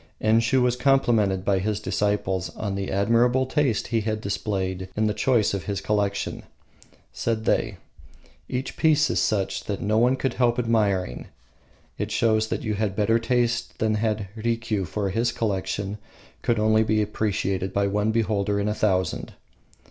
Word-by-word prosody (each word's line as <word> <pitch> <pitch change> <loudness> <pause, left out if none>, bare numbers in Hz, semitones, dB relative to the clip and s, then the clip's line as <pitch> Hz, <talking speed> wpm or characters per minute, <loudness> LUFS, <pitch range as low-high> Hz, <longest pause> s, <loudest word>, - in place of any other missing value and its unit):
Enshiu 115 +3 +3
was 125 -1 +2
complimented 115 -8 +2
by 100 -2 +2
his 105 +2 -1
disciples 95 -3 -1
on 100 -3 -3
the 100 0 -3
admirable 115 +6 +3
taste 130 -4 0
he 115 -2 +1
had 110 0 -2
displayed 95 -2 -3
in 110 - +2
the 105 - +1
choice 110 0 +2
of 95 -5 -3
his 100 +1 -2
collection. 100 -1 -1 0.7
Said 110 -1 -2
they, 110 -4 +1 0.7
"Each 130 +1 -3
piece 155 -2 +3
is - - +1
such 100 -3 0
that 100 -2 -3
no 110 +1 +1
one 125 +3 +4
could 135 0 -2
help 120 -1 +2
admiring. 105 - 0 0.7
It - - -2
shows 110 -1 +2
that - - -3
you 110 - -1
had 105 -1 -1
better 110 +2 +2
taste 120 0 0
than 110 -1 +1
had 105 -1 -1
Rikiu, 115 -3 -1
for 100 0 -2
his 115 +4 +1
collection 100 -1 -2 0.4
could 115 - +1
only 110 +1 +3
be 110 -1 +2
appreciated 100 -3 -1
by 100 0 +1
one 105 +2 0
beholder 105 -2 0
in 100 - -1
a 105 - +1
thousand." 95 -5 0
110 Hz, 165 wpm, -25 LUFS, 100-115 Hz, 0.7 s, one